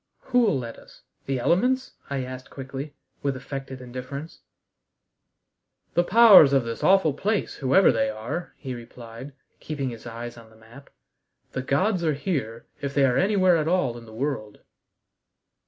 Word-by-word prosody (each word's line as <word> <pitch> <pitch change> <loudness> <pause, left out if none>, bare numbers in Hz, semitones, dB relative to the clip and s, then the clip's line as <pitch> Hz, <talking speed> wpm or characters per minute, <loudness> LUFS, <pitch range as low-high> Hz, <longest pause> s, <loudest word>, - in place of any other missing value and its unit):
"Who'll 235 - +4
let 115 -3 -6
us? - - -18 0.2
The 135 -1 0
elements?" 250 - +1 0.2
I 140 -2 -2
asked 130 0 -8
quickly, 135 +2 -7 0.3
with 140 -1 -1
affected 135 0 -7
indifference. 130 +5 -7 1.5
"The 175 - +3
powers 200 -8 +8
of 135 -2 +4
this 115 0 -5
awful 190 -6 +4
place, 205 +8 -1
whoever 140 +8 +4
they 110 -2 +1
are," 110 +11 -5
he 135 -3 -6
replied, 120 +2 -10 0.3
keeping 140 -4 -4
his 115 0 -10
eyes 120 +1 -7
on 115 -1 -14
the 110 - -20
map. 115 +5 -16 0.6
"The 130 - -3
gods 180 +8 +1
are 155 -3 +1
here, 135 - -3 0.2
if 140 0 -4
they 140 -1 +5
are 125 -2 +2
anywhere 185 -3 +4
at 155 -1 -1
all 165 -9 +1
in 115 -1 -11
the - - -12
world." 120 -5 -4
135 Hz, 155 wpm, -25 LUFS, 120-170 Hz, 1.5 s, powers